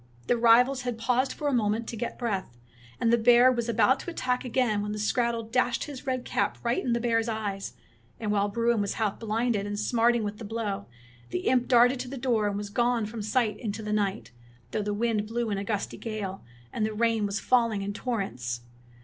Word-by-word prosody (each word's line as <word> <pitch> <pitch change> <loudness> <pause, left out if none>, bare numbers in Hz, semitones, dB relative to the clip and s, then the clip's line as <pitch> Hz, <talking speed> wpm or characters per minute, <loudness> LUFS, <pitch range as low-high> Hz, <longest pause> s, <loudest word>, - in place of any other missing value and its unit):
The - - +2
rivals 240 +3 +5
had 245 -2 -3
paused 250 +3 +1
for 295 - -4
a 285 - +1
moment 220 -1 +1
to - - -5
get 235 +2 -4
breath, 195 - -3 0.4
and 230 0 +2
the 235 - +4
bear 245 +2 +6
was 235 -2 -2
about 235 +4 +3
to - - -6
attack 255 -7 -1
again 240 -4 +1
when 210 0 -3
the - - -4
skrattel 230 +2 0
dashed 250 +2 0
his 280 -4 -8
red 255 -1 -1
cap - - 0
right 235 0 0
in 245 - 0
the 235 - +1
bear's 230 -1 +1
eyes, 205 - -3 0.5
and 215 -2 -2
while 205 0 +2
Bruin 230 +1 +1
was 200 - -2
half 215 -3 -1
blinded 225 -2 0
and 205 0 -3
smarting 235 +1 +2
with 210 0 -4
the - - -7
blow, 205 -2 -3 0.4
the 180 - -2
imp 250 -1 +2
darted 245 +1 +5
to 255 - -4
the 270 +2 -6
door 240 -5 +1
and 200 -1 -2
was 205 0 -5
gone 240 0 +1
from 220 +1 -6
sight 215 +1 0
in 220 -4 -3
to 220 +1 -6
the 210 0 -2
night, 205 - -1 0.4
though 215 - -1
the 210 0 -2
wind 215 0 0
blew 230 0 -2
in 200 - -1
a - - -3
gusty 205 -1 -3
gale, 210 -4 -5 0.3
and 220 - -1
the 215 0 0
rain 225 -2 +2
was 200 0 -2
falling 230 -5 +2
in 200 +1 -3
torrents. 125 - -3
225 Hz, 225 wpm, -27 LUFS, 210-240 Hz, 0.5 s, bear